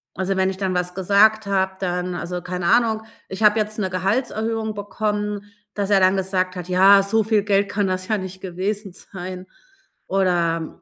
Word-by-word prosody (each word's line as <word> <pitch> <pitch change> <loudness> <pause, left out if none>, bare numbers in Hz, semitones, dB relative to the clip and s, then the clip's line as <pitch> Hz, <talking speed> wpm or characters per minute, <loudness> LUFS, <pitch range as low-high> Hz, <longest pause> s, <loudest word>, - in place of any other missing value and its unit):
Also, 190 +1 -1
wenn 190 0 +2
ich 190 - -4
dann 190 -1 -2
was 180 0 -2
gesagt 205 +3 +3
habe, 190 -1 +1
dann 180 -1 -2
also, 175 0 -4
keine 180 0 -4
Ahnung, 225 0 +3 0.2
ich 190 +3 -5
habe 210 +1 +5
jetzt 215 0 -2
'ne 200 -3 -1
Gehaltserhöhung 220 +3 -1
bekommen, 205 0 -3 0.2
dass 200 -1 -2
er 200 -2 +5
dann 185 0 +4
gesagt 185 -1 -1
hat: 180 0 -7
„Ja, 195 +2 +6
so 220 +3 +1
viel 215 -2 +2
Geld 200 -1 +1
kann 205 -1 0
das 185 0 -3
ja 215 - +1
nicht 190 -1 -7
gewesen 195 +2 -4
sein.“ 185 0 -9 0.6
Oder, 170 -4 0
195 Hz, 185 wpm, -22 LUFS, 185-210 Hz, 0.6 s, Ja